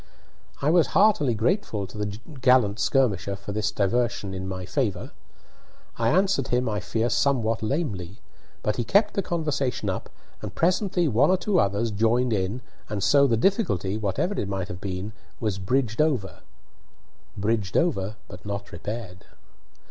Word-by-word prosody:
I 150 Hz, -, +4 dB
was 170 Hz, -1 st, +4 dB
heartily 170 Hz, -, +4 dB
grateful 110 Hz, -, 0 dB
to -, -, -13 dB
the 105 Hz, -1 st, -3 dB, 0.2 s
gallant 125 Hz, -5 st, +4 dB
Skirmisher 100 Hz, -5 st, +1 dB
for 100 Hz, +1 st, -7 dB
this 105 Hz, 0 st, 0 dB
diversion 105 Hz, -1 st, 0 dB
in 95 Hz, 0 st, -4 dB
my 95 Hz, -1 st, -5 dB
favour. -, -, -2 dB, 0.8 s
I 115 Hz, 0 st, +1 dB
answered 190 Hz, -, +2 dB
him, 125 Hz, 0 st, +1 dB
I 105 Hz, -2 st, -1 dB
fear, 115 Hz, +2 st, -1 dB
somewhat 120 Hz, -4 st, +1 dB
lamely; 110 Hz, -, -3 dB, 0.4 s
but 105 Hz, -, 0 dB
he 120 Hz, -, 0 dB
kept 205 Hz, -, +3 dB
the 200 Hz, -, 0 dB
conversation 140 Hz, -, -1 dB
up, 95 Hz, -, -5 dB, 0.3 s
and 105 Hz, -2 st, -7 dB
presently 180 Hz, 0 st, +2 dB
one 135 Hz, +4 st, +3 dB
or 185 Hz, -, +4 dB
two 190 Hz, +1 st, +1 dB
others 100 Hz, +3 st, +1 dB
joined 115 Hz, +3 st, +2 dB
in 100 Hz, +5 st, -1 dB, 0.3 s
and 105 Hz, -2 st, -2 dB
so 140 Hz, +6 st, +5 dB
the 115 Hz, -3 st, +2 dB
difficulty, 110 Hz, -, +1 dB
whatever 110 Hz, -, -1 dB
it 100 Hz, -, -2 dB
might 95 Hz, -2 st, -3 dB
have 90 Hz, 0 st, -7 dB
been, 95 Hz, +2 st, -4 dB, 0.3 s
was 105 Hz, -4 st, -2 dB
bridged 115 Hz, +4 st, 0 dB
over 130 Hz, -, 0 dB, 1.0 s
bridged 105 Hz, -1 st, 0 dB
over, 110 Hz, -, 0 dB
but 90 Hz, +1 st, -11 dB
not 100 Hz, 0 st, -5 dB
repaired. 95 Hz, +1 st, -6 dB
110 Hz, 155 wpm, -25 LUFS, 100-140 Hz, 1.0 s, so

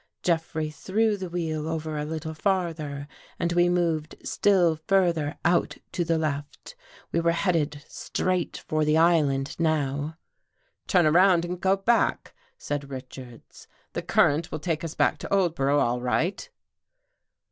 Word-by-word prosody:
Jeffrey 160 Hz, -2 st, -1 dB
threw 210 Hz, +7 st, 0 dB
the 190 Hz, -3 st, -6 dB
wheel 160 Hz, -3 st, -3 dB
over 160 Hz, -1 st, -3 dB
a 150 Hz, 0 st, -2 dB
little 160 Hz, +1 st, -5 dB
farther 160 Hz, -6 st, -2 dB, 0.3 s
and 170 Hz, 0 st, -1 dB
we 175 Hz, 0 st, +4 dB
moved 165 Hz, -3 st, 0 dB
still 180 Hz, -5 st, +3 dB
further 165 Hz, -3 st, +1 dB
out 175 Hz, +1 st, +2 dB
to 175 Hz, -, -1 dB
the 165 Hz, -1 st, +1 dB
left. 145 Hz, -2 st, -4 dB, 0.4 s
We 170 Hz, -, +1 dB
were 170 Hz, 0 st, +2 dB
headed 155 Hz, -5 st, 0 dB
straight 185 Hz, -2 st, -2 dB
for 155 Hz, 0 st, +1 dB
the 150 Hz, +1 st, +3 dB
island 150 Hz, -5 st, +2 dB
now. 150 Hz, -1 st, 0 dB, 0.3 s
" -, -, -50 dB, 0.3 s
Turn 180 Hz, -4 st, +4 dB
around 175 Hz, +2 st, +5 dB
and 180 Hz, +1 st, -5 dB
go 190 Hz, 0 st, +3 dB
back," 230 Hz, +4 st, +1 dB, 0.2 s
said 145 Hz, -1 st, -4 dB
Richards. 130 Hz, -2 st, -10 dB
" -, -, -38 dB
The -, -, -2 dB
current 155 Hz, +3 st, +2 dB
will -, -, -2 dB
take 160 Hz, +1 st, -2 dB
us 165 Hz, -1 st, -5 dB
back -, -, +2 dB
to -, -, -7 dB
Oldborough 160 Hz, -7 st, +2 dB
all 125 Hz, -2 st, +1 dB
right." 170 Hz, -, -1 dB
160 Hz, 150 wpm, -26 LUFS, 150-175 Hz, 0.4 s, around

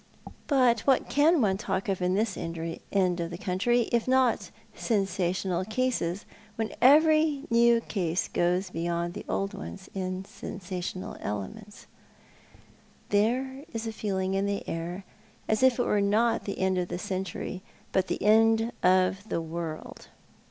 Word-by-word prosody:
But 250 Hz, -5 st, +4 dB
what 265 Hz, +4 st, +1 dB
can 305 Hz, +2 st, +4 dB
one 195 Hz, -4 st, +2 dB
talk 190 Hz, -1 st, -2 dB
of 190 Hz, -2 st, -1 dB
in 180 Hz, +1 st, +1 dB
this 210 Hz, -1 st, 0 dB
end 165 Hz, 0 st, -5 dB
of 170 Hz, +1 st, -1 dB
the 170 Hz, -, -6 dB
century, 230 Hz, +7 st, +1 dB
if 235 Hz, 0 st, +1 dB
not 260 Hz, -2 st, +2 dB, 0.2 s
sensational 185 Hz, -3 st, -1 dB
cases, 215 Hz, -5 st, -1 dB, 0.3 s
when 225 Hz, 0 st, -3 dB
every 310 Hz, +1 st, +5 dB
new 235 Hz, 0 st, +5 dB
case 180 Hz, -6 st, -1 dB
goes 180 Hz, +2 st, 0 dB
beyond 170 Hz, +1 st, -2 dB
the 205 Hz, -, -7 dB
old 195 Hz, +1 st, -1 dB
ones 195 Hz, -1 st, -8 dB
in 185 Hz, 0 st, -3 dB
sensational 185 Hz, -1 st, -6 dB
elements? 105 Hz, -, -6 dB, 1.2 s
There 255 Hz, +6 st, +1 dB
is 225 Hz, 0 st, -3 dB
a 225 Hz, -, -4 dB
feeling 190 Hz, -3 st, -2 dB
in 195 Hz, +1 st, +1 dB
the 200 Hz, 0 st, -3 dB
air 175 Hz, +3 st, -4 dB, 0.4 s
as 215 Hz, +1 st, +1 dB
if 260 Hz, -2 st, +5 dB
it 245 Hz, -, +2 dB
were 210 Hz, -, +2 dB
not 215 Hz, +4 st, +2 dB
the 200 Hz, -, -4 dB
end 190 Hz, -1 st, +1 dB
of 180 Hz, -, -1 dB
the -, -, -4 dB
century, 185 Hz, 0 st, -4 dB, 0.3 s
but 190 Hz, -, +1 dB
the -, -, -3 dB
end 225 Hz, +2 st, +4 dB
of 185 Hz, +3 st, +2 dB
the -, -, 0 dB
world. 165 Hz, -1 st, -6 dB
195 Hz, 150 wpm, -28 LUFS, 180-230 Hz, 1.2 s, every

